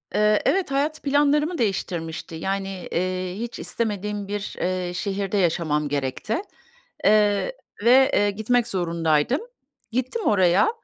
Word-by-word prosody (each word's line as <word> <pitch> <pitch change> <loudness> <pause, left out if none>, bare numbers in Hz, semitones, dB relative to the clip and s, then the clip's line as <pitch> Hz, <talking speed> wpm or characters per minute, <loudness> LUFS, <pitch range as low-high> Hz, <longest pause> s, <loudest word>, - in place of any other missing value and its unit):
Eee, 210 0 +3
evet 375 -7 +1
hayat 295 +3 -1
planlarımı 295 +4 +2
değiştirmişti. 175 -7 -3
Yani, 195 +2 -3
eee, 185 +1 -1
hiç 235 0 -5
istemediğim 210 -2 -3
bir, 205 0 -4
eee, 180 -1 -1
şehirde 195 +1 -2
yaşamam 160 -4 +1
gerekti. 140 - -2 0.7
Eee, 210 - +3 0.3
ve, 260 +3 +6
eee, 205 0 +3
gitmek 230 +3 +1
zorundaydım. 170 - +1 0.5
Gittim 255 - -2
oraya. 190 -1 +4
200 Hz, 115 wpm, -24 LUFS, 180-235 Hz, 0.7 s, ve